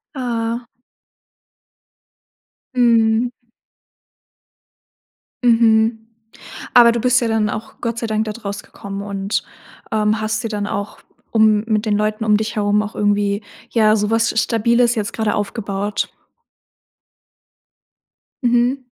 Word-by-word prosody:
Aha. 235 -2 -2 2.1
Mhm. 230 -1 +3 2.1
Mhm. 225 -1 +4 0.8
Aber, 235 -1 +8
du 235 - -1
bist 250 +1 +3
ja 240 - 0
dann 220 -1 +1
auch 220 +1 -7
Gott 230 -1 -3
sei 230 - -2
Dank 220 0 0
dort 215 +1 -7
rausgekommen 200 0 -6
und, 200 0 -2 0.5
ähm, 215 0 +1
hast 215 +1 -2
dir - - -1
dann 205 -2 -3
auch, 205 0 -4 0.3
um 215 -2 +4
mit 215 -1 0
den 210 -1 +2
Leuten 215 +1 -1
um 210 -1 +4
dich 215 +1 -2
herum 205 0 +2
auch 210 +1 -7
irgendwie, 205 0 +1 0.3
ja, 215 -2 +4
sowas 225 +2 +1
Stabiles 235 +2 +2
jetzt 210 -3 -3
gerade 220 -2 -1
aufgebaut. 205 -1 -2 2.4
Mhm. 245 +2 +2
220 Hz, 115 wpm, -19 LUFS, 210-230 Hz, 2.4 s, Aber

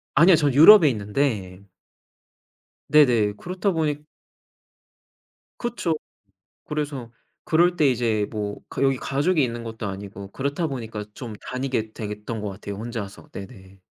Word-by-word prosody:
아니요. 170 +5 +7
저는 145 -4 +1
유럽에 160 +3 +9
있는데 105 -4 -2 1.3
네네. 120 -9 +5
그렇다 185 - -2
보니 150 -2 -1 1.5
그쵸. 235 -9 -2 0.7
그래서 145 -6 -4 0.3
그럴 175 +2 +3
때 155 -4 +3
이제 115 -4 0
뭐 105 -2 -4
그 135 - -2
여기 135 -1 +3
가족이 150 +5 +1
있는 120 -2 -3
것도 110 -2 -5
아니고 100 0 -7
그렇다 140 - -2
보니까 115 -6 -5
좀 115 -2 -7 0.2
다니게 130 -4 -2
되겠던 105 +1 -5
것 105 - -3
같아요 100 +1 -7
혼자서. 110 -2 -7
네네. 95 -2 -11
120 Hz, 275 characters per minute, -24 LUFS, 105-150 Hz, 1.5 s, 유럽에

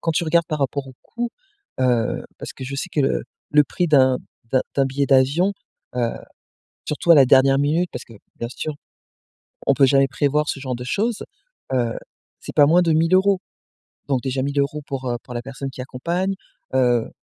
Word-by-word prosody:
quand 165 - 0
tu 165 - 0
regardes 170 +1 +2
par 155 - -3
rapport 140 0 -1
au 130 - -12
coût, 235 0 -4 0.5
heu, 120 -3 +1 0.2
parce - - -7
que 130 - -8
je 135 +2 -5
sais - - -3
que 150 - +1
le 135 - +1 0.3
le 150 0 +5
prix 175 +6 -1
d'un 130 -4 +4 0.3
d'un 130 - +3
d'un 135 - +4
billet 140 +1 -1
d'avion, 140 +9 +3 0.4
heu, 120 -2 +1 0.8
surtout 150 +3 -1
à - - +9
la 140 -3 +7
dernière 135 +1 +5
minute, 160 +5 +1
parce - - -6
que 115 - -15 0.2
bien 115 - -4
sûr, 155 +4 -5 0.9
on 140 - +4
peut 135 0 +5
jamais 135 +1 +4
prévoir 150 +1 0
ce 135 - -2
genre 130 -2 -3
de 125 - -7
choses, 215 - -1 0.5
heu, 120 -3 0 0.5
c'est - - -9
pas 145 - +6
moins 170 +4 +5
de 165 -2 +2
1000 165 +3 +3
euros. 190 0 +3 0.7
Donc 135 -3 0
déjà 130 0 -2
1000 140 +1 -1
euros 140 +2 -1
pour, 135 -2 -4
heu, 120 - -1
pour 125 - -10
la 120 - -2
personne 135 +1 -6
qui 130 - -8
accompagne, 170 +9 -2 0.4
heu, 120 -3 +2
140 Hz, 200 wpm, -22 LUFS, 130-155 Hz, 0.9 s, à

